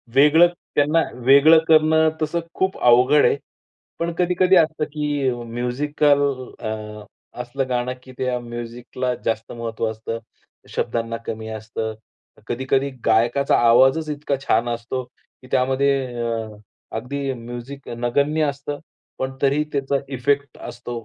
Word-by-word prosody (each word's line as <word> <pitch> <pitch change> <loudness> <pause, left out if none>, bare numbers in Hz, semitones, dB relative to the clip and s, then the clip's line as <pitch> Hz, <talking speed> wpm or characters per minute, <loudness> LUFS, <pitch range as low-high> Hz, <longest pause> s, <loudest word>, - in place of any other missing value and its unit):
वेगळं 150 +5 +7 0.3
त्यांना 150 +3 +3 0.2
वेगळं 145 +4 +7
करणं 160 0 +5
तसं 155 +3 0
खूप 190 0 -1
अवघड 125 +4 +5
आहे. - - +3 0.6
पण 170 0 -1
कधी-कधी 180 +1 +3
असतं 155 -2 +3
की 145 -3 0
म्युझिकल 140 +5 +1 0.4
अ, 110 - -3 0.7
असलं 130 +2 -3
गाणं 125 0 -1
की 130 - -13
त्या 125 -1 0
म्युझिकला 120 +1 -4
जास्त 115 0 -2
महत्त्व 115 -1 -3
असतं. 110 +1 -5 0.5
शब्दांना 115 -1 -2
कमी 110 0 -5
असतं. 110 0 -5 0.5
कधी-कधी 130 +3 0 0.2
गायकाचा 120 +5 +3
आवाजच 135 +6 +5
इतका 145 -1 -2
छान 115 +2 +3
असतो 120 +2 -3
की 130 - -22
त्यामध्ये 135 +2 +2 0.3
अ, 115 -1 -2 0.5
अगदी 135 +3 -3
म्युझिक 120 +3 -8
नगण्य 140 +6 0
असतं. 140 +1 -4 0.4
पण 130 0 -2
तरीही 140 +2 +2
त्याचा 140 0 0 0.2
इफेक्ट 140 +2 0
असतो. 120 -1 -7
130 Hz, 125 wpm, -22 LUFS, 120-145 Hz, 0.7 s, वेगळं